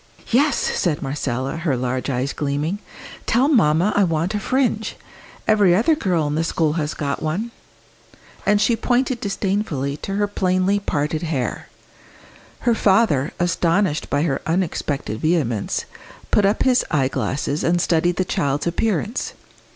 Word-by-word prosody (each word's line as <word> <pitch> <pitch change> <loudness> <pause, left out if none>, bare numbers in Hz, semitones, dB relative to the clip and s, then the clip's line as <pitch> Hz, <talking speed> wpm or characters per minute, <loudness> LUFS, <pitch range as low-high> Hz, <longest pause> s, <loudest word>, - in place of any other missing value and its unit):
"Yes!" 275 +3 +3
said 155 -5 0
Marcella, 135 0 -2
her 160 -6 0
large 125 +2 -2
eyes 130 +1 -1
gleaming; 150 +6 -2 0.5
"tell 250 +4 +3
mamma 195 - +3
I 205 - +4
want 165 +2 0
a 210 - 0
'fringe.' 230 -2 0 0.5
Every 205 -5 +5
other 235 - +3
girl 180 - 0
in 145 - -1
the 160 +2 0
school 160 -2 0
has 155 -2 -2
got 140 -1 -3
one." 185 +10 -2 0.9
And 210 0 +3
she 230 +3 +3
pointed 250 +1 0
disdainfully 190 -9 -1
to 195 +5 -5
her 205 0 +2
plainly 190 0 +1
parted 155 -4 -1
hair. 150 -7 -3 0.9
Her 235 - +3
father, 190 - +3
astonished 175 -1 +1
by 145 +1 +1
her 145 -5 -1
unexpected 155 - -1
vehemence, 140 - 0 0.5
put 205 - +4
up 205 - +1
his 255 -1 +3
eyeglass 135 -2 -1
and 170 +4 +1
studied 175 +1 +2
the 185 - 0
child's 145 -4 -1
appearance. 210 +5 -1
170 Hz, 145 wpm, -21 LUFS, 145-205 Hz, 0.9 s, Every